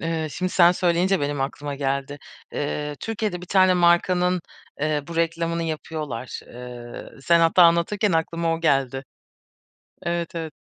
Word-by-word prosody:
Eee, 165 Hz, -1 st, -2 dB
şimdi 185 Hz, +3 st, -3 dB
sen 175 Hz, -1 st, +6 dB
söyleyince 180 Hz, +2 st, +1 dB
benim 145 Hz, -1 st, -2 dB
aklıma 140 Hz, +1 st, -3 dB
geldi. 140 Hz, +1 st, -2 dB, 0.3 s
Eee, 150 Hz, 0 st, -3 dB
Türkiye'de 215 Hz, -5 st, -3 dB
bir 180 Hz, -, -10 dB
tane 185 Hz, 0 st, +4 dB
markanın, 180 Hz, +1 st, +3 dB, 0.4 s
eee, 150 Hz, -1 st, 0 dB
bu 170 Hz, -, -6 dB
reklamını 170 Hz, 0 st, 0 dB
yapıyorlar. 155 Hz, -6 st, -5 dB
Eee, 120 Hz, -1 st, -9 dB
sen 170 Hz, +4 st, +4 dB
hatta 165 Hz, +2 st, +5 dB
anlatırken 170 Hz, +4 st, +3 dB
aklıma 165 Hz, 0 st, 0 dB
o 165 Hz, -, -6 dB
geldi. 135 Hz, -3 st, +1 dB, 1.0 s
Evet, 170 Hz, 0 st, -2 dB
evet. 160 Hz, -2 st, -4 dB
165 Hz, 140 wpm, -23 LUFS, 145-175 Hz, 1.0 s, sen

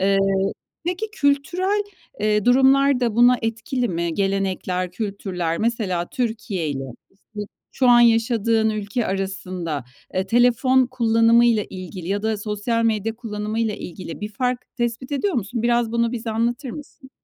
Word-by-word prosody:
Eee, 195 Hz, +1 st, +3 dB, 0.7 s
peki, 360 Hz, +5 st, -1 dB
kültürel, 360 Hz, +6 st, +1 dB, 0.4 s
eee, 210 Hz, -1 st, +2 dB
durumlar 270 Hz, +1 st, +5 dB
da 235 Hz, -3 st, 0 dB
buna 245 Hz, +1 st, +6 dB
etkili 230 Hz, +2 st, -2 dB
mi? 170 Hz, -1 st, -2 dB
Gelenekler, 190 Hz, -2 st, -1 dB
kültürler 180 Hz, -4 st, -3 dB
mesela 205 Hz, -7 st, -1 dB
Türkiye'yle, 195 Hz, -, -2 dB, 0.3 s
işte, 210 Hz, +2 st, -11 dB, 0.3 s
şu 260 Hz, -2 st, +2 dB
an 240 Hz, 0 st, +7 dB
yaşadığın 225 Hz, -1 st, +3 dB
ülke 215 Hz, +2 st, -2 dB
arasında, 185 Hz, -6 st, -3 dB, 0.3 s
eee, 185 Hz, +1 st, 0 dB
telefon 245 Hz, +3 st, +4 dB
kullanımıyla 230 Hz, -2 st, +3 dB
ilgili 185 Hz, -1 st, -7 dB
ya 200 Hz, +1 st, -1 dB
da 220 Hz, -1 st, 0 dB
sosyal 215 Hz, +3 st, -1 dB
medya 220 Hz, 0 st, 0 dB
kullanımıyla 215 Hz, -1 st, -2 dB
ilgili 180 Hz, -3 st, -8 dB
bir 210 Hz, -, -3 dB
fark 250 Hz, +2 st, -1 dB, 0.2 s
tespit 240 Hz, +3 st, -2 dB
ediyor 365 Hz, +7 st, 0 dB
musun? 230 Hz, +1 st, -2 dB
Biraz 235 Hz, -1 st, +1 dB
bunu 235 Hz, 0 st, +1 dB
bize 230 Hz, -1 st, -4 dB
anlatır 235 Hz, +4 st, -1 dB
mısın? 270 Hz, -2 st, -11 dB
225 Hz, 135 wpm, -22 LUFS, 195-245 Hz, 0.7 s, an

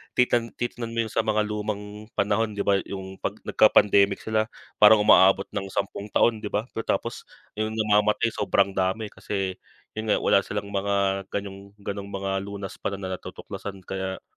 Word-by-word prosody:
titan 120 Hz, -2 st, +3 dB
titignan 120 Hz, -1 st, -4 dB
mo 115 Hz, -, +2 dB
'yong 110 Hz, -, -7 dB
sa -, -, 0 dB
mga 105 Hz, 0 st, +2 dB
lumang 105 Hz, 0 st, -5 dB
panahon 105 Hz, +1 st, +1 dB
'di 100 Hz, -, -1 dB
ba, 100 Hz, -1 st, +3 dB
'yung 95 Hz, -1 st, -7 dB
'pag -, -, -3 dB
nagka-pandemic 100 Hz, -1 st, +4 dB
sila, 110 Hz, -1 st, 0 dB, 0.3 s
parang 105 Hz, 0 st, +8 dB
umaabot 95 Hz, -1 st, +6 dB
ng 95 Hz, -1 st, -3 dB
10 100 Hz, +1 st, -3 dB
taon 110 Hz, +1 st, +2 dB
'di 105 Hz, -, -5 dB
ba, 105 Hz, +1 st, -1 dB
pagkatapos 115 Hz, -, -3 dB, 0.3 s
'yong 110 Hz, 0 st, -1 dB
namamatay 105 Hz, +1 st, +2 dB
sobrang 100 Hz, 0 st, +1 dB
dami, 95 Hz, +3 st, -1 dB
kasi 95 Hz, -1 st, -4 dB, 0.3 s
'yun 110 Hz, 0 st, -5 dB
nga, -, -, +4 dB
wala -, -, +4 dB
silang 100 Hz, +1 st, -5 dB
mga 100 Hz, -1 st, 0 dB
ganyong 100 Hz, 0 st, -6 dB
gano'ng 100 Hz, 0 st, -4 dB
mga 95 Hz, -1 st, -2 dB
lunas 100 Hz, -1 st, -7 dB
pa 100 Hz, -, -2 dB
na 100 Hz, -, -9 dB
na 95 Hz, -, -4 dB
natutuklasan 95 Hz, -2 st, -8 dB
kaya, 95 Hz, 0 st, -4 dB
100 Hz, 170 wpm, -25 LUFS, 100-110 Hz, 0.3 s, parang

